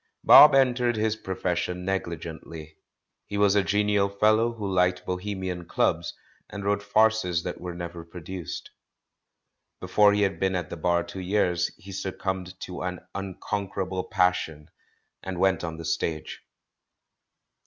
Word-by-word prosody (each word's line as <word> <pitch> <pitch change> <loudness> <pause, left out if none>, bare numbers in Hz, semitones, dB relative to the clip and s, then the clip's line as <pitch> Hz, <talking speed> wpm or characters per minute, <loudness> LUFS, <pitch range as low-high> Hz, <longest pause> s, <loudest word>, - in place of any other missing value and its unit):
'* - - -55
Bob 150 -2 +9
entered 125 -3 +3
his 110 0 0
profession 90 -3 -3
negligently. 85 -4 -5 0.5
He 100 - -4
was 100 -1 +4
a 100 - +4
genial 105 0 +1
fellow 110 +3 +2
who 105 -3 -5
liked 90 -1 +1
bohemian 90 -1 -4
clubs, - - 0 0.3
and 100 -1 -7
wrote 100 0 +1
farces 105 -4 +2
that 90 - -5
were 90 -1 -6
never 85 -1 -6
produced. 85 0 -7 1.1
Before 105 -1 +4
he 105 0 +2
had 95 -1 -1
been 95 -1 +1
at 90 -3 -3
the - - -3
Bar 85 +1 +1
two 95 - -8
years 90 -2 +1
he 100 - -12
succumbed 95 -1 -4
to 90 -2 -6
an 90 0 -4
unconquerable 95 -1 -4
passion 90 -5 0 0.5
and 95 -1 -5
went 95 -1 +2
on 80 -1 -4
the 80 - -7
stage. 80 -1 -3
95 Hz, 145 wpm, -26 LUFS, 90-100 Hz, 1.1 s, Bob